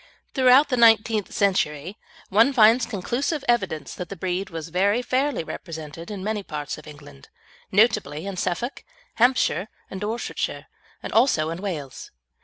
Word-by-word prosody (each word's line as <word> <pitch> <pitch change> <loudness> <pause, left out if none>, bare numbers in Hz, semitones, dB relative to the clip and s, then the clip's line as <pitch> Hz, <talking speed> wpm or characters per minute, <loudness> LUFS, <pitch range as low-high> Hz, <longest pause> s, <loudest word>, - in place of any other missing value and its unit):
Throughout 260 +2 +5
the 250 - 0
nineteenth 225 -2 +4
century, 170 -3 0 0.3
one 225 +8 +4
finds 230 0 +5
conclusive 245 - -2
evidence 190 -11 0
that 180 - -7
the 200 - -6
breed 185 +1 -3
was 165 -2 -6
very 200 +7 +1
fairly 260 - 0
represented 160 0 -8
in 200 -3 -6
many 215 0 -2
parts 150 -5 -6
of 155 - -15
England, 145 - -13 0.4
notably 190 -7 +2
in 200 -1 -4
Suffolk, 185 +8 -3 0.3
Hampshire, 235 - +2 0.2
and 190 - -6
Dorsetshire, 220 +3 -3 0.4
and - - -6
also 190 - +3
in 165 +2 -6
Wales. 155 -10 -5
200 Hz, 145 wpm, -24 LUFS, 165-235 Hz, 0.4 s, Throughout